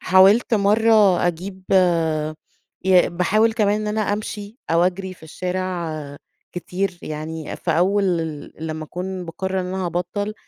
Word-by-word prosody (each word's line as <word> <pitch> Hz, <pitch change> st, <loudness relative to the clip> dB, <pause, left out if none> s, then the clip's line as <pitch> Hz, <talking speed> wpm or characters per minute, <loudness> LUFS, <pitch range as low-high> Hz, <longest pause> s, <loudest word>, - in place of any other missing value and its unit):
حاولت 195 Hz, +6 st, +5 dB
مرة 210 Hz, -2 st, +4 dB
أجيب 185 Hz, +3 st, -4 dB, 1.2 s
ي 185 Hz, -1 st, +5 dB
باحاول 210 Hz, +6 st, +2 dB
كمان 210 Hz, -1 st, +1 dB
إن 215 Hz, -, -3 dB
أنا 210 Hz, +1 st, -1 dB
امشي 210 Hz, +1 st, -5 dB
أو 165 Hz, +1 st, +4 dB
اجري 185 Hz, +1 st, -2 dB
في -, -, -24 dB
الشارع 180 Hz, 0 st, -3 dB, 0.6 s
كتير، 180 Hz, +1 st, -3 dB
يعني 155 Hz, +1 st, -5 dB
في 175 Hz, -, -3 dB
أول 190 Hz, +5 st, +2 dB
ل 160 Hz, -5 st, -2 dB
لمَّا 155 Hz, 0 st, -4 dB
اكون 180 Hz, +2 st, -5 dB
باقرر 190 Hz, +3 st, -3 dB
إن 180 Hz, -, -4 dB
أنا 185 Hz, 0 st, -2 dB
هابطل، 205 Hz, +5 st, -3 dB
185 Hz, 135 wpm, -22 LUFS, 175-205 Hz, 1.2 s, حاولت